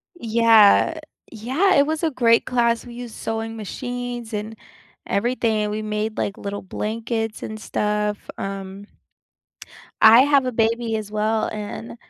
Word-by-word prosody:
Yeah, 225 -6 +4 0.3
yeah, 265 - +1
it 280 - +5
was 315 +2 -3
a 325 - +1
great 230 -3 +3
class, 235 -2 +1
we 240 -1 -10
used 240 -2 -8
sewing 225 0 -4
machines 245 +1 -6
and 215 +1 -4 0.5
everything, 220 -1 0
we 210 +1 -3
made, 215 0 -3
like, 200 - -2
little 200 0 -5
blankets 225 +2 -4
and 215 0 -6
stuff, 210 -1 -2
um 195 0 -6 1.2
I 225 +2 +9
have 280 -2 +3
a 255 - -1
baby 225 0 0
as 210 -1 -6
well, 215 +1 0
and 215 +2 -7
225 Hz, 140 wpm, -22 LUFS, 210-240 Hz, 1.2 s, I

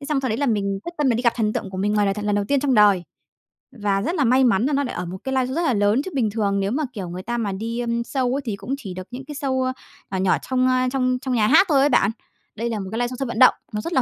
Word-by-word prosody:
Thế 280 - -9
xong 290 -3 +1
sau 260 - -2
đấy 220 - -1
là 285 - 0
mình 200 -4 0
quyết 345 - -6
tâm 290 -3 +2
mình 235 - +2
đi 245 - -2
gặp 235 -2 +3
thần 215 -2 0
tượng 195 - -4
của 190 - -7
mình 205 +2 0
ngoài 205 -1 +2
đời 195 - +1
thật 210 -1 -5
lần 205 0 +1
đầu 205 -1 0
tiên 280 -2 +2
trong 275 -3 +1
đời, 205 -4 +5 0.8
và 200 -1 +1
rất 335 - -2
là 290 - +2
may 255 +2 +4
mắn 235 -1 +3
là 290 - 0
nó 280 +1 +1
lại 250 - -5
ở 180 - -3
một 180 +2 -6
cái 265 0 -3
liveshow 260 -1 +2
rất 335 - 0
là 310 -8 +1
lớn, 205 +5 +2
chứ 375 - -5
bình 235 -6 +1
thường 200 -2 0
nếu 195 +2 -1
mà, 305 +4 0
kiểu, 190 -5 -5
người 180 +1 -6
ta 240 +1 -3
mà 210 -4 -1
đi, 225 +5 -4
ờm, 235 -1 -1
show 255 0 -1
ấy 280 - -2
thì 215 -3 -2
cũng 260 +7 -4
chỉ 195 -9 -7
được 185 +1 -8
những 255 +2 -7
cái 295 +1 -8
show, 265 -2 -1
ơ, 255 0 -1 0.4
nhỏ 190 - -1
nhỏ 190 0 +2
trong, 255 0 +1
a, 255 0 +2
trong 255 -2 +1
trong 260 -2 -2
nhà 215 -3 +3
hát 325 - +6
thôi 280 -3 +4
ấy 280 - +4
bạn. 200 -6 +3 0.4
Đây 235 +2 -2
là 220 -2 -2
một 190 - -5
cái 225 - -3
liveshow 245 +1 -1
sân 270 - -2
vận 235 - -4
động, 255 - +8 0.2
nó 210 - -2
rất 335 - -5
là 260 - +4
235 Hz, 345 wpm, -22 LUFS, 205-265 Hz, 0.8 s, động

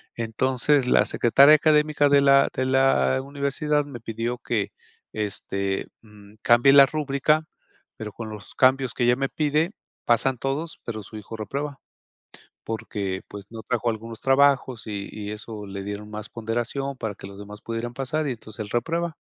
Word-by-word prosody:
Entonces, 130 +4 +1
la - - +4
Secretaria 140 +5 +5
académica 150 -1 +3
de 140 0 +5
la 140 0 +5
de 130 - -1
la 130 - +3
universidad, 145 +1 -1
me 140 -4 -9
pidió 115 +2 -3
que, 115 -4 -2 0.4
este, 100 -2 -2
mm, 105 -1 -17
cambie 120 +4 +6
la 140 -1 +9
rúbrica. 150 +1 +1 0.5
Pero, 110 -1 -6
con 115 -2 -7
los 105 -1 -10
cambios 130 -1 +3
que 125 - -1
ella 120 +1 +4
me 135 0 -1
pide, 155 +3 0 0.3
pasan 120 +2 +2
todos, 145 +6 -3
pero 110 -2 -5
su 110 +3 -10
hijo 110 +2 -8
reprueba. 140 +6 -4 0.9
Porque, 100 -4 -4
pues, 100 -1 -9
no 115 -1 -8
trajo 120 +1 -1
algunos 115 +1 -6
trabajos, 135 -3 +3
y 100 -2 -5
y 105 -1 -6
eso 105 0 -7
le 100 0 -6
dieron 105 +1 -6
más 105 0 -7
ponderación, 120 +4 -3
para 110 -4 -4
que - - -11
los 100 0 -11
demás 105 +1 -10
pudieran 115 +1 -4
pasar, 140 +4 -2
y 135 - -1
entonces 110 -2 -9
él 105 - -6
reprueba". 165 +7 -1
120 Hz, 170 wpm, -24 LUFS, 110-140 Hz, 0.9 s, la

